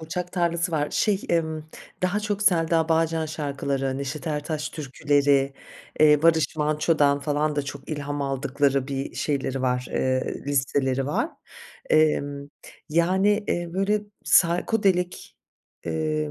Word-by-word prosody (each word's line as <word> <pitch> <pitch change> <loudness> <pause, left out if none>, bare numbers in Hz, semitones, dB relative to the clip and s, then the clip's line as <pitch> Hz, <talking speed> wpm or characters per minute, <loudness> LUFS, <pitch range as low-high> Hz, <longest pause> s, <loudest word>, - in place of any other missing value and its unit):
Burçak 175 +3 -5
Tarlası 170 -1 0
var, 150 -2 0
şey, 205 -3 +1
ımm, 160 -2 -1 0.3
daha 190 +3 +1
çok 210 -1 -2
Selda 165 -4 +3
Bağcan 165 0 +1
şarkıları, 140 -3 -2
Neşet 140 +1 -5
Ertaş 150 0 -2
Türküleri, 140 -1 +1 0.5
eee, 150 -1 +6
Barış 160 -1 +3
Manço'dan 150 -1 +2
falan 150 +1 -1
da 145 - +1
çok 140 0 -8
ilham 145 -1 -3
aldıkları 135 0 0
bir 135 0 -4
şeyleri 135 -2 -2
var, 125 0 0
eee, 130 0 0
listeleri 135 -1 0
var. 145 - -1 0.6
Emm, 145 -2 +2 0.4
yani, 190 +6 +2
eee, 175 -1 -1
böyle, 195 +3 +1 0.2
psychodelic, 180 +1 +2 0.7
eee, 75 -2 -1
150 Hz, 120 wpm, -25 LUFS, 140-170 Hz, 0.7 s, eee